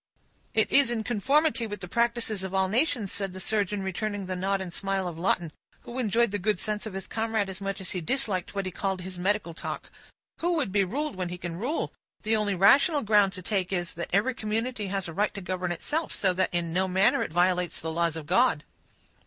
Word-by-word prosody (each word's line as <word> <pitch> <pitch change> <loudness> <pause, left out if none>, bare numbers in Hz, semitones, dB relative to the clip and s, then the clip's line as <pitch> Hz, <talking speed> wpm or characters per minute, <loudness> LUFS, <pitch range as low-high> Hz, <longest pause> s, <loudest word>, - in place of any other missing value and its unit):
"It 220 - +3
is 280 -3 +5
in 230 -2 -1
conformity 260 +3 +2
with 205 -1 -5
the 180 - -5
practices 235 -1 0
of 190 0 -4
all 190 0 +3
nations," 230 - +1
said 195 -2 -2
the 185 - -7
surgeon, 205 0 0
returning 200 +1 -2
the 185 0 -3
nod 195 +2 0
and 185 -2 -5
smile 195 -1 -1
of 165 -2 -6
Lawton, 170 -2 +1 0.3
who 240 +2 -6
enjoyed 235 -1 +2
the 205 - -1
good 210 0 +1
sense 210 +1 -2
of 200 - -7
his 195 -1 -4
comrade 220 -2 -1
as 190 +1 -8
much 195 0 -3
as 190 - -4
he 180 - -3
disliked 205 - -1
what 195 -1 -1
he 185 - -3
called 190 0 -2
"his 185 0 -7
medical 190 -2 0
talk." - - -6 0.5
"Who 350 +1 +1
would 285 - 0
be 200 0 +3
ruled 285 +10 -2
when 185 -1 -3
he 180 - -5
can 175 -1 -5
rule? 250 - -2 0.3
The 220 0 +3
only 210 -2 +1
rational 275 - +5
ground 205 -2 +4
to 185 -1 -8
take 190 -2 -1
is, 175 -2 -2
that 170 - -5
every 210 +8 +3
community 220 0 -2
has 195 -1 -2
a 165 - -6
right 205 +5 0
to - - -3
govern 180 -1 -2
itself, 305 - -2
so 190 -2 +2
that 185 +1 +1
in 170 -2 -1
no 190 +2 +2
manner 190 +2 +3
it - - -2
violates 180 +1 +2
the 160 - -3
laws 165 0 +1
of 160 -2 -6
God." 200 - +3
195 Hz, 230 wpm, -28 LUFS, 180-220 Hz, 0.5 s, is